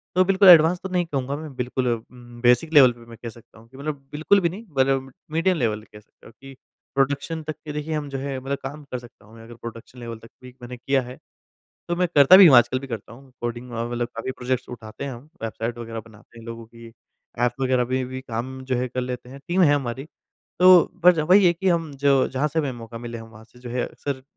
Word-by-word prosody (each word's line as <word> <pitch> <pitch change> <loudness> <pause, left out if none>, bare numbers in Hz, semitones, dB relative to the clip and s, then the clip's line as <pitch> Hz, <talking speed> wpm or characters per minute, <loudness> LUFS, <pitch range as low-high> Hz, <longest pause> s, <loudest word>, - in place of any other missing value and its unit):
तो 185 - +5
बिल्कुल 195 +1 +4
एडवांस 170 +1 +7
तो 190 - -4
नहीं 180 -1 0
कहूँगा 140 -3 -3
मैं 155 -3 -9
बिल्कुल 125 +1 -2 0.6
बेसिक 125 +7 +3
लेवल 135 -4 +8
पे 120 0 -16
मैं 115 -1 -13
कह 115 - -4
सकता 115 0 -17
हूँ 115 - -18
कि 130 - -16
मतलब 140 -1 -6
बिल्कुल 160 +7 +3
भी 170 - +1
नहीं 205 +7 -9
मतलब 135 0 +1 0.2
मीडियम 165 +3 +1
लेवल 110 -5 0
पे 110 - -18
कह 105 - -11
सकता 105 - -21
हूँ 110 - -16
कि 135 0 -12 0.4
प्रोडक्शन 145 +4 0
तक 155 0 -5
के 150 - -6
देखिए 150 +1 -4
हम 145 -2 -4
जो 135 - -4
हैं 135 0 -4
मतलब 135 +2 -3
काम 145 +3 -7
कर 125 - -3
सकता 120 -3 -17
हूँ 110 +2 -17
मैं 115 - -13
अगर 120 +1 -12
प्रोडक्शन 115 +2 -10
लेवल 115 -1 -7
तक 115 - -14 0.2
भी 125 0 -12
मैंने 125 +1 -8
किया 135 +2 0
है, 125 +1 -10 0.7
तो 175 - -1
मैं 180 - +2
करता 145 +6 +9
भी 195 -2 +10
हूँ 135 - +8
आजकल 120 +2 +4
भी 135 - -9
करता 115 -3 -7
हूँ। 130 +2 -15
कोडिंग 120 +1 -5
व 115 0 -3
मतलब 120 0 -2
काफ़ी 115 +3 -4
प्रोजेक्ट्स 125 0 -3
उठाते 110 +1 -8
हैं 140 - -4
हम, 125 +5 -12
वेबसाइट 115 +1 -4
वग़ैरह 115 -1 -6
बनाते 110 +1 -17
हैं 115 - -12
लोगों 115 0 -7
की 115 0 -14 0.5
ऐप 120 -1 +2
वग़ैरह 130 -1 +2
में 130 0 0
भी 130 +1 -6
काम 130 +2 -5
जो 130 -1 -1
है 125 +1 -1
कर 130 +1 -3
लेते 125 0 -5
हैं। 135 +1 -11
टीम 180 +2 +2
है 145 -3 +5
हमारी 130 -1 -3 0.6
तो 185 -1 +7
बस 180 -2 +7
वही 190 0 +7
है 170 - +5
कि 190 +3 -1
हम 165 -3 0 0.2
जो 135 -2 +4
जहाँ 135 +3 -1
से 160 +3 -3
हमें 140 -4 -1
मौका 115 -1 -9
मिले 120 0 -7
हम 115 0 -11
वहाँ 110 0 -15
से 125 +2 -21
जो 120 -1 -8
है 125 0 -1
अक्सर 135 -2 -6
130 Hz, 255 wpm, -23 LUFS, 120-150 Hz, 0.7 s, भी